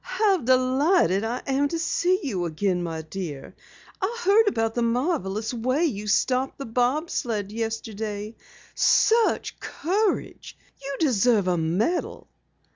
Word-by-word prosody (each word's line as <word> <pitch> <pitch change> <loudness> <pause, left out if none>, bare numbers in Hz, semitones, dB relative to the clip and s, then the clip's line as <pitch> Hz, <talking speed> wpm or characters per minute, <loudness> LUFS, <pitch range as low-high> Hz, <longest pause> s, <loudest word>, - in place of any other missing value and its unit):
"How 410 -3 +2
delighted 260 - +2
I 235 +3 -3
am 275 +1 +1
to 330 - -3
see 360 +3 +1
you 190 -10 -2
again, 175 +2 -1
my 165 -2 -4
dear. 155 -5 -7 0.5
I 435 +6 -1
heard 420 +3 +5
about 225 - 0
the 240 - -1
marvelous 230 - -1
way 255 +7 0
you 210 -9 -3
stopped 255 +5 +1
the 275 - -6
bob 250 +8 0
sled 210 -4 -2
yesterday. 220 -1 -4 0.4
Such 455 0 +2
courage! 400 +5 -2 0.2
You 275 0 -5
deserve 235 - +2
a 180 - +2
medal." 180 - -1
240 Hz, 130 wpm, -25 LUFS, 205-310 Hz, 0.5 s, heard